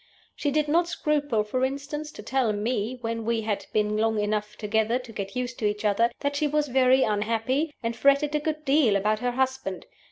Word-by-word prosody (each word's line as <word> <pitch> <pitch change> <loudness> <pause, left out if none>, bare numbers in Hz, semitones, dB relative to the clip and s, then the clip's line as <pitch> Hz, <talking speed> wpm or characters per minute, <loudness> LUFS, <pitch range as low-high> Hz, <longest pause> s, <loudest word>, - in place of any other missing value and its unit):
She 290 - -1
did 300 +1 +1
not 335 +3 +3
scruple, 290 -9 0
for 255 +5 -2
instance, 285 +3 -3
to - - -10
tell 250 -1 +1
me 220 +3 -2
(when 230 -1 -3
we 230 0 0
had 210 -2 -3
been 210 0 +1
long 220 0 +1
enough 210 0 -1
together 220 +2 +1
to 250 -2 -9
get 195 -2 -6
used 250 0 -3
to 215 - -1
each 210 +1 -3
other) 210 +3 +3
that 285 0 -1
she 300 +1 +1
was 295 0 0
very 260 +1 +4
unhappy, 230 +8 0
and 230 0 -1
fretted 280 +4 +3
a 300 - +2
good 305 0 -3
deal 270 -7 +4
about 210 +2 +1
her 245 +1 -1
husband. 260 -7 -2
245 Hz, 210 wpm, -26 LUFS, 215-285 Hz, -, very